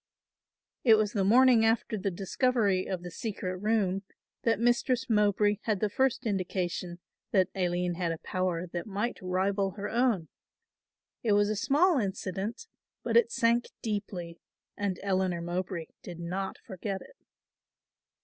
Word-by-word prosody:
It 225 -4 +7
was 215 -1 +1
the 200 - +1
morning 240 +3 +6
after 225 0 +1
the 200 -1 -1
discovery 195 +1 +1
of 185 -2 -3
the 175 - -7
secret 185 -2 -4
room 200 -2 +1 0.4
that 225 -3 +1
Mistress 240 +2 +2
Mowbray 210 -1 +3
had 215 -4 +1
the 210 0 0
first 265 +2 +1
indication 180 -3 -2 0.3
that 190 -1 +3
Aline 180 -1 0
had 170 -1 -1
a 165 - -3
power 180 0 -2
that 175 +3 -5
might 210 +4 -2
rival 190 +1 0
her 200 - -3
own. 230 -8 +1 0.9
It 220 -3 +2
was 205 +1 +3
a - - 0
small 295 - +3
incident, 200 - -3 0.4
but - - -1
it 470 -1 +5
sank 235 - +2 0.2
deeply 195 -6 -4 0.4
and 200 -3 -2
Eleanor 185 -3 +1
Mowbray 175 0 -3 0.2
did 175 -2 -9
not 185 +3 -3
forget 190 +1 -5
it. - - -18
200 Hz, 145 wpm, -29 LUFS, 185-225 Hz, 0.9 s, It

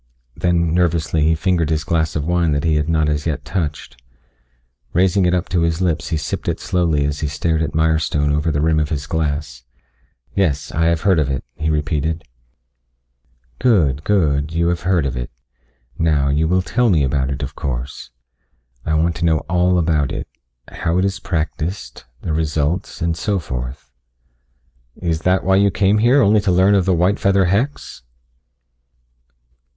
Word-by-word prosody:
Then 85 -2 +1
nervously 85 -2 +1
he 80 +2 +3
fingered 85 -1 0
his 80 -1 0
glass 80 -2 0
of 75 -2 -1
wine 85 -2 +1
that 70 0 -1
he 80 - +2
had 75 +1 0
not 80 -2 +2
as 75 +1 -1
yet 70 -3 -3
touched. 75 -6 -4 0.9
Raising 95 +1 +3
it 90 - +2
up 90 - -2
to 90 -1 +1
his 85 0 0
lips 85 -4 -1
he 80 - -1
sipped 75 - -4
it - - -1
slowly 85 -6 0
as 75 0 -2
he 75 - -1
stared 80 +3 -1
at 80 - -2
Mirestone 80 -2 +1
over 75 +2 0
the 75 0 0
rim 80 0 +2
of 75 -1 -1
the 70 -2 -3
glass. 75 -5 -3 0.7
"Yes. 75 -8 0
I 80 +1 0
have 85 -1 +1
heard 95 -5 +3
of 75 -3 0
it," 65 -1 -2
he 80 0 -3
repeated. 75 +1 -1 1.4
"Good, 80 - +2
good. 75 -6 +1
You 85 +1 +1
have 85 0 -1
heard 90 -4 +1
of 65 -3 -2
it. - - -4 0.7
Now, 75 -4 +2
you 75 +3 +1
will 90 +2 +1
tell 120 +5 +1
me 80 -7 +3
about 65 0 0
it, 70 0 -4
of 70 +2 -5
course. 65 -3 -5 0.7
I 80 - 0
want 80 +2 +1
to 85 - -1
know 80 -2 +2
all 90 +1 +1
about 80 -5 +1
it - - -5 0.4
how 85 +2 -1
it 95 - +2
is 95 -1 -2
practiced, 80 -4 -4 0.2
the 80 - -3
results, 80 +3 -1
and 85 -1 0
so 100 +4 -1
forth." 65 -4 -6 1.0
"Is 85 -3 -2
that 90 +2 +2
why 95 0 +3
you 100 +1 +4
came 100 +2 +2
here? 125 +5 +4
Only 105 +1 +4
to 95 - +1
learn 95 +3 +4
of 95 -3 +3
the 95 -2 +2
white 90 +4 +2
feather 100 -1 +3
hex?" 110 +11 -2
80 Hz, 180 wpm, -19 LUFS, 75-90 Hz, 1.4 s, you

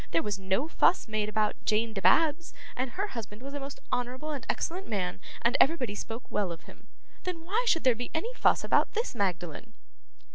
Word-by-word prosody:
There 165 0 +2
was 205 -2 -2
no 190 +9 0
fuss 330 - +3
made 215 -1 -1
about 215 0 0
Jane 220 +1 +1
Dibabs, 300 - +3 0.2
and 255 -1 -2
her 405 +2 -2
husband 225 - -7
was 275 +1 -7
a 285 - -3
most 275 0 -7
honourable 250 +5 -2
and 280 -5 -5
excellent 370 +3 -2
man, 185 -5 -2 0.2
and 235 +1 +3
everybody 265 -8 +3
spoke 225 +3 -6
well 200 -4 0
of 165 - -7
him. - - -16 0.3
Then 340 -3 -4
why 435 +8 +1
should 330 -7 +3
there 255 -2 +6
by 245 +2 -5
any 445 +10 -2
fuss - - +3
about - - +2
this 455 - 0
Magdalen? 190 0 -2
245 Hz, 195 wpm, -29 LUFS, 210-320 Hz, 0.3 s, there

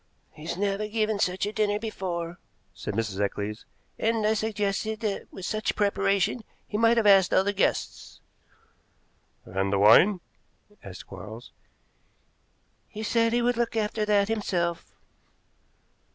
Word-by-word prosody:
"He's 160 +3 -6
never 200 +1 -1
given 215 -1 -1
such 185 -1 0
a 210 - -4
dinner 210 -1 +1
before," 175 -6 -4 0.3
said - - -6
Mrs. 105 -3 -2
Eccles, 100 +2 -3 0.3
"and 225 -1 +1
I 215 - +3
suggested 215 0 -2
that 210 -3 -3
with 190 - -8
such 215 +2 -1
preparation 200 +1 +1 0.2
he - - -7
might 230 +2 +4
have 225 - +2
asked 195 -3 +6
other 195 +2 +3
guests." 195 - -2 1.3
"And 95 +1 -2
the 100 - +2
wine?" 140 - +6 0.6
asked 95 -2 -10
Quarles. 105 +5 -10 1.4
"He 215 - -7
said 230 +1 +2
he 240 +1 +1
would 245 0 +1
look 235 -1 -1
after 215 0 -1
that 205 -1 +3
himself." 180 -6 -2
205 Hz, 135 wpm, -26 LUFS, 170-215 Hz, 1.4 s, asked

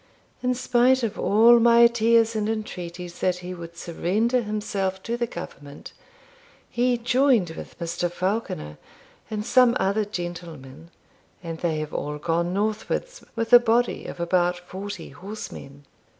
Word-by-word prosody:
In 250 0 0
spite 255 +1 +3
of 225 - -2
all 225 +5 +6
my 235 0 +6
tears 230 -1 +3
and 215 0 -1
entreaties 180 -5 -5
that 185 -1 +1
he 180 - -5
would 170 -1 -10
surrender 210 +9 0
himself 205 -3 -3
to 235 - -2
the 240 0 -1
government, 145 -7 -9 0.7
he 245 0 +1
joined 240 - +2
with - - -10
Mr. 170 +1 -2
Falconer 180 - -3 0.5
and 210 -1 -4
some 250 0 +4
other 200 +3 +1
gentlemen, 170 -6 -7 0.5
and 165 -1 -6
they 165 -3 -1
have 155 0 -6
all 150 0 -3
gone 170 +3 -1
northwards, 220 - -2
with 230 +1 -2
a 245 - +12
body 240 +1 +1
of - - -8
about 175 +1 +1
forty 185 0 -8
horsemen. 145 -5 -9
200 Hz, 140 wpm, -24 LUFS, 170-235 Hz, 0.7 s, a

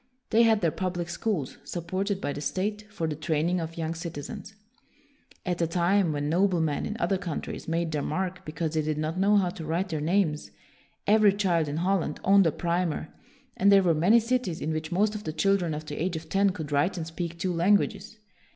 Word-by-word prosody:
They 225 - +5
had 225 -2 +4
their 165 -3 +2
public 175 -1 -3
schools, 175 - -2
supported 185 +3 -3
by 145 - -2
the 145 - -6
state, 210 +7 -3
for 170 -6 -3
the 155 -2 -2
training 160 +3 0
of 165 0 -5
young 165 0 -2
citizens. 170 +4 -7 0.9
At 180 -2 -1
a 165 - +2
time 175 +1 +2
when 145 -1 -2
noblemen 170 -3 +1
in 215 - -4
other 195 -2 +1
coun 175 -5 -3
tries - - -7
made 165 0 -1
their 150 -2 -1
mark 185 +5 -3
because 155 +1 -3
they 160 - +1
did 155 0 -2
not 155 +3 -2
know 200 +2 +4
how 185 -3 +2
to 165 - -8
write 170 +5 -1
their 155 -3 -2
names, 160 -2 +1 0.6
every 210 0 +5
child 175 -6 +1
in 145 +1 -3
Holland 175 -3 0
owned 195 -2 +5
a - - +2
primer, 170 -1 -1 0.5
and 200 +2 +4
there 195 -1 +6
were 170 -2 +4
many 180 +9 +5
cities 230 -7 -1
in 155 - -2
which 155 +2 -4
most 205 +4 +2
of 210 -1 -6
the 155 - -3
children 180 -2 +1
of 155 +1 -6
the 150 0 -5
age 175 0 -1
of 160 0 -7
ten 200 +1 +3
could 160 -5 -5
write 145 +7 +1
and 165 - -3
speak 170 +1 -5
two 180 +1 -1
languages. 200 +4 +1
175 Hz, 215 wpm, -27 LUFS, 160-195 Hz, 0.9 s, there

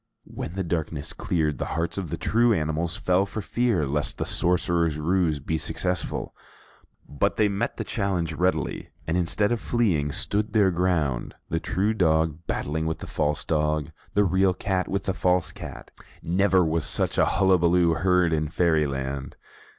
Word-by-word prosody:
When 80 - -7
the 95 - -1
darkness 80 -3 -3
cleared, 75 -4 -1
the - - -1
hearts 85 +1 -1
of 95 -5 -4
the - - -3
true 115 +1 +3
animals 80 +1 -1
fell 90 +2 +2
for 110 - -5
fear 110 -5 0
lest 75 +2 -2
the - - -2
sorcerer's 85 -3 +1
ruse 80 0 +1
be 80 +3 -2
successful; 90 +3 -2 0.7
but 70 - -1
they 105 - +4
met 100 +4 -2
the - - -2
challenge 95 -6 -1
readily, 90 +4 -1 0.2
and 80 - -1
instead 90 +4 +1
of 120 - 0
fleeing, 90 -12 +1
stood 105 +7 +1
their 100 -4 +4
ground; 85 -8 0
the 80 - 0
true 100 +6 0
dog 80 -5 +2
battling 80 +2 -2
with 80 - -2
the - - -8
false 75 -1 -1
dog, 75 0 0 0.2
the 105 - +5
real 95 0 +2
cat 95 -2 -1
with 100 0 -2
the 95 - -1
false 90 -4 +1
cat. - - -9 0.3
Never 95 +1 +3
was 80 0 0
such - - -1
a - - +5
hullaballoo 90 -3 +3
heard 90 -1 +3
in 75 -1 0
Fairyland. 70 -5 0
85 Hz, 165 wpm, -25 LUFS, 80-95 Hz, 0.7 s, the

